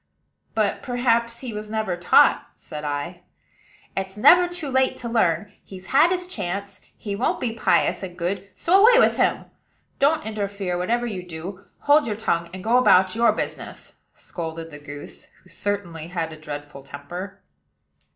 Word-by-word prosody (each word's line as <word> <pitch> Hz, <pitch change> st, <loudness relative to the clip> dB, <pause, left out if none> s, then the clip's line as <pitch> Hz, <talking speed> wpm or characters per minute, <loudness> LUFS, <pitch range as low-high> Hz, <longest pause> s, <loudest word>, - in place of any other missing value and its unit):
"But 215 Hz, -2 st, 0 dB
perhaps 235 Hz, -2 st, 0 dB
he 250 Hz, -4 st, -6 dB
was 210 Hz, 0 st, -6 dB
never 215 Hz, -4 st, -1 dB
taught," 175 Hz, 0 st, +4 dB
said 150 Hz, -2 st, -9 dB
I. 150 Hz, +5 st, -4 dB, 0.7 s
"It's 190 Hz, +1 st, -4 dB
never 355 Hz, +11 st, +7 dB
too 350 Hz, -4 st, -4 dB
late 265 Hz, 0 st, +2 dB
to 240 Hz, -, -5 dB
learn: 205 Hz, -4 st, +1 dB
he's 185 Hz, -1 st, -11 dB
had 300 Hz, +5 st, +6 dB
his 360 Hz, 0 st, -1 dB
chance; 200 Hz, -, -5 dB, 0.2 s
he 205 Hz, -2 st, -4 dB
won't 230 Hz, -, 0 dB
be 230 Hz, -3 st, -2 dB
pious 225 Hz, -, +1 dB
and 180 Hz, -2 st, -7 dB
good, 185 Hz, +3 st, -3 dB
so 380 Hz, +4 st, +4 dB
away 480 Hz, +2 st, +7 dB
with -, -, +4 dB
him. -, -, +1 dB, 0.5 s
Don't 295 Hz, 0 st, +2 dB
interfere, 200 Hz, -4 st, -3 dB
whatever 230 Hz, +7 st, 0 dB
you 205 Hz, -6 st, -4 dB
do: 180 Hz, +3 st, -8 dB, 0.2 s
hold 290 Hz, -1 st, +4 dB
your 215 Hz, -, -2 dB
tongue, 170 Hz, -6 st, -1 dB
and 185 Hz, 0 st, -8 dB
go 235 Hz, +3 st, +3 dB
about 185 Hz, -5 st, +4 dB
your 235 Hz, +1 st, +4 dB
business," -, -, -6 dB, 0.2 s
scolded 165 Hz, -1 st, -7 dB
the 150 Hz, -, -10 dB
goose, 145 Hz, 0 st, -10 dB, 0.2 s
who 185 Hz, -, -21 dB
certainly 180 Hz, -7 st, -4 dB
had 165 Hz, -2 st, -3 dB
a -, -, -8 dB
dreadful 145 Hz, -2 st, -8 dB
temper. 145 Hz, +8 st, -8 dB
200 Hz, 165 wpm, -23 LUFS, 175-235 Hz, 0.7 s, never